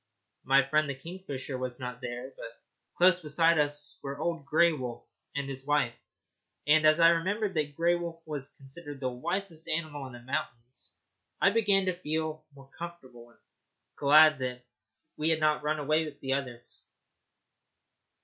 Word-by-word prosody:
My 135 0 +4
friend 155 +1 +2
the 140 - -2
kingfisher 140 -4 -6
was 125 0 -4
not 125 0 -6
there, 125 +2 -6
but 115 0 -10 0.4
close 180 0 +5
beside 165 0 +3
us 145 0 -1
were 140 0 -5
old 160 -2 -3
Grey 170 +2 +5
Wolf 125 -5 -5 0.3
and 140 -1 -2
his 135 -1 -6
wife, 145 -4 +1 0.7
and, 155 +1 +5
as 155 +1 +5
I 165 0 +8
remembered 190 +5 0
that 150 -3 -2
Grey 170 +2 +3
Wolf 170 -1 -4
was 145 -3 -3
considered 145 +1 -9
the 130 -2 -1
wisest 170 +5 -3
animal 155 -4 -3
in 130 - -11
the 120 - -9
mountains, 125 -2 -5 0.4
I 195 - +5
began 205 -3 +3
to 185 - +1
feel 155 -2 -3
more 135 0 -16
comfortable, 130 -9 -9
and 120 - -24
was - - -42 0.5
glad 155 +1 +6
that 125 -1 -4 0.5
we 155 +1 +1
had 160 -1 +2
not 155 -1 +2
run 150 +1 0
away 155 +2 +1
with 150 -2 -9
the 135 -1 -1
others. 125 -3 -5
150 Hz, 170 wpm, -29 LUFS, 135-165 Hz, 0.7 s, I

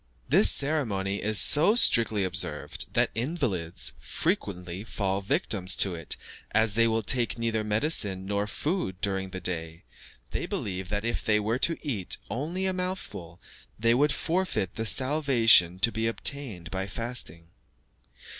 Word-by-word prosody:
This - - +4
ceremony 110 -10 0
is 110 0 +3
so 165 +9 +6
strictly 115 - +4
observed 90 -5 -2
that - - +2
invalids 115 - -2
frequently 90 0 -3
fall 100 -3 -2
victims 95 -1 -1
to 95 - +2
it, 80 -3 -2 0.4
as 110 -2 +3
they 115 +2 +3
will 115 0 0
take 120 +1 +2
neither 115 -2 -1
medicine 105 -4 0
nor 100 +1 -2
food 105 - -3
during 95 -2 -2
the 95 0 -6
day; 85 -2 -4 0.5
they - - -3
believe 95 -2 -4
that 105 +1 -2
if 115 - -2
they 105 -1 +2
were 110 +4 -1
to 165 +3 +1
eat 110 -11 -1
only 165 +10 -3
a 190 - 0
mouthful, 180 - -5 0.4
they 115 +2 +2
would 145 +4 +2
forfeit 170 - -1
the 110 0 -3
salvation 125 - +4
to 115 +5 +2
be 110 +1 -1
obtained 115 -7 0
by 95 +1 -3
fasting. 100 -7 -4
105 Hz, 145 wpm, -27 LUFS, 95-130 Hz, 0.5 s, so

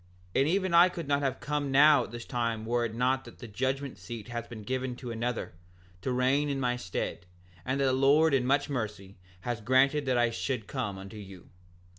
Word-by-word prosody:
7:2 - - +3
And 140 - +2
even 185 0 +1
I 175 +2 +7
could 170 -4 -6
not 140 0 +1
have 135 -2 -1
come 145 -1 -2
now 145 +2 +6
at - - -12
this 120 +1 -8
time 115 -3 -2
were 120 +1 +1
it 110 -1 -5
not 130 +2 +1
that - - -13
the 120 - -9
judgment 130 +5 -2
seat 115 -2 -8
hath 120 -1 -5
been 110 -3 -8
given 130 +2 -2
to 125 -1 -7
another, 115 -2 -3 0.5
to 130 - -2
reign 130 +4 +2
in 140 -1 -1
my 125 -2 +1
stead; 90 -5 -4 0.4
and 130 +8 -1
the 135 -2 +2
Lord 140 +4 +4
in 135 -2 +3
much 140 +3 +2
mercy 105 -7 -5 0.2
hath 120 0 -4
granted 135 +4 +3
that 130 -1 +2
I 120 -1 +3
should 125 -2 -3
come 105 -5 -3
unto 95 +3 -9
you. 95 -3 -11
125 Hz, 215 wpm, -29 LUFS, 115-140 Hz, 0.5 s, I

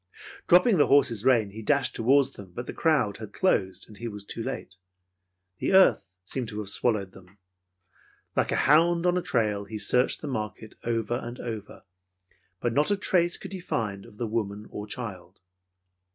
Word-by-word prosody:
Dropping 180 +2 +5
the 145 - +5
horse's 120 -7 +3
rein, 120 -6 +3
he 110 +2 -8
dashed 135 +4 +1
toward 135 +3 +3
them, 95 -3 -12
but 120 - -5
the - - -6
crowd 135 - +1
had 110 -2 -9
closed, 95 - 0
and 105 -2 -14
he 120 - -4
was 105 -2 -7
too 115 - -5
late. 110 -7 -6 0.8
The - - 0
earth 185 - +4
seemed 120 +3 -4
to 105 - -7
have 105 -2 -3
swallowed 105 -4 0
them. 95 +1 -17 1.0
Like - - +1
a - - +1
hound 170 +3 +4
on 180 0 +3
a 180 - +1
trail, 105 -8 0
he 110 +1 -6
searched 125 +4 +2
the 150 - -5
market 110 -3 -5
over 115 +1 -1
and 120 +1 -7
over, 110 -4 -7 0.8
but 120 - -1
not 145 +4 +2
a 205 - +2
trace 175 -3 +1
could 195 0 -8
he 190 - -5
find 105 - -3
of 105 - -17
the 120 - -2
woman 105 -2 -3
or 105 0 -6
child. 100 -6 -7
115 Hz, 185 wpm, -27 LUFS, 105-140 Hz, 1.0 s, Dropping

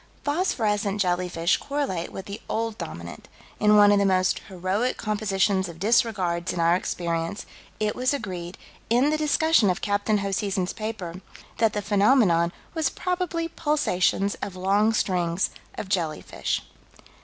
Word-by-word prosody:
Phosphorescent 215 - 0
jellyfish 175 -2 +1
correlate 275 -13 -3
with 190 - -7
the 200 +2 -7
Old 225 -1 -1
Dominant: 85 +2 -8 0.3
in 210 0 +5
one 205 0 +7
of 205 - +4
the - - +3
most 185 -1 +2
heroic 190 +6 -1
compositions 200 -3 0
of 170 - -10
disregards 185 -4 +1
in 175 - -4
our 170 +1 +4
experience, 170 0 -2 0.3
it 210 -1 0
was 255 +1 +1
agreed, 185 -9 -4 0.3
in 250 +6 +3
the - - +2
discussion 310 - +3
of 180 - 0
Capt. 205 0 -1
Hoseason's 200 -2 0
paper, 195 -5 -5 0.4
that 225 -2 +3
the 210 - -2
phenomenon 200 -5 +3 0.2
was 320 -4 +1
probably 360 -2 -2
pulsations 205 - +1
of 195 - -5
long 200 +4 +2
strings 180 -4 0 0.3
of - - -4
jellyfish. 170 -5 -2
200 Hz, 140 wpm, -25 LUFS, 180-225 Hz, 0.4 s, one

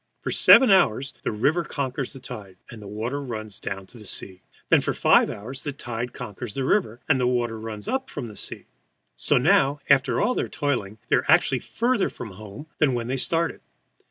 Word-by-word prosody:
For - - -2
seven 260 -6 +7
hours 140 - +3
the - - -2
river 145 +11 +1
conquers 135 -3 -3
the 135 - -10
tide, 105 -7 -9
and 115 -2 -10
the 100 - -9
water 115 +7 -3
runs 110 -6 -6
down 95 -1 -5
to 110 +2 -14
sea. 95 -1 -6 0.3
Then - - +5
for - - -2
five - - +4
hours 125 +6 -6
the 145 - -4
tide 120 -2 -5
conquers 105 +1 -7
the 135 - -1
river, 125 - +1
and 145 -4 +3
the 125 - +2
water 120 -2 0
runs 110 -1 -7
up 265 0 -2
from 120 - -5
the 105 - -10
sea. - - -8 0.5
So - - +3
now, 145 0 +3
after 130 -3 +3
all 250 - +2
their - - -2
toiling, 130 -9 -2
they - - +5
are - - -1
actually - - +4
further 240 -3 0
from 115 -4 -8
home 105 +7 -10
than 140 -5 +3
when 120 0 -3
they 130 - -1
started. 165 +5 -1
125 Hz, 205 wpm, -24 LUFS, 110-145 Hz, 0.5 s, seven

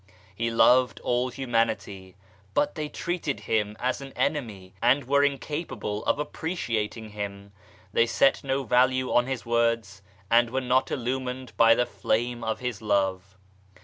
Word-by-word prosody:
He 115 +4 -1
loved 125 +2 +4
all 125 +1 0
Humanity, 115 -7 -2 0.4
but 145 0 +2
they 150 -1 -4
treated 170 -4 -3
Him 105 -1 -1
as 130 +2 -1
an 135 -1 -9
enemy 105 -11 -2
and 130 +4 +4
were 140 +3 +3
incapable 145 -6 -2
of - - +2
appreciating 115 - -3
Him. 100 -1 -6 0.4
They 115 - +4
set 115 +4 +3
no 135 0 -1
value 130 +1 +2
on 120 +1 +3
His 130 -2 -4
words 115 -4 0 0.3
and 120 0 +5
were 130 +2 -1
not 130 0 +1
illumined 130 0 -3
by 115 0 +6
the 125 - +2
Flame 120 0 -1
of 110 +1 -2
His 125 -3 -4
Love. 95 -2 -1
120 Hz, 145 wpm, -26 LUFS, 110-130 Hz, 0.4 s, by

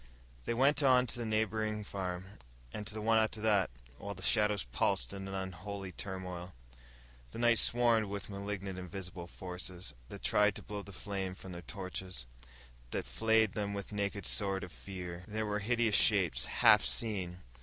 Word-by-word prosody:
They 115 - 0
went 135 +4 +4
on 130 -2 +6
to 120 - -2
the 115 - -2
neighboring 110 0 0
farm, 95 -2 -4 0.5
and 105 - -4
to - - -4
the 110 - -4
one 115 0 +5
after 110 0 +1
that, 105 -4 +3 0.3
while 100 +1 -5
the 95 - -7
shadows 105 -2 +3
pulsed - - 0
in 95 0 -5
an 95 - -4
unholy 95 +1 -5
turmoil. 90 -1 -5 0.8
The - - -6
night 120 -1 +4
swarmed 115 -3 +4
with 100 0 -5
malignant 100 -2 -4
invisible 90 -1 -6
forces, 90 0 -5 0.2
that - - -9
tried 105 +11 +4
to - - -7
blow 105 0 -5
the 100 - -11
flame 95 -1 -4
from 95 - -9
their 85 -1 -6
torches, 90 - -5 0.6
that - - -2
flayed 110 -2 +3
them 100 -1 -2
with 100 - -5
the 105 - -7
naked 100 -2 -1
sword 95 -2 +2
of 90 - -7
fear. 90 -3 -7
There 110 +1 -2
were 105 0 0
hideous 115 +1 +2
shapes, 90 - +3
half - - +6
seen. 95 -6 -1
100 Hz, 175 wpm, -34 LUFS, 90-110 Hz, 0.8 s, on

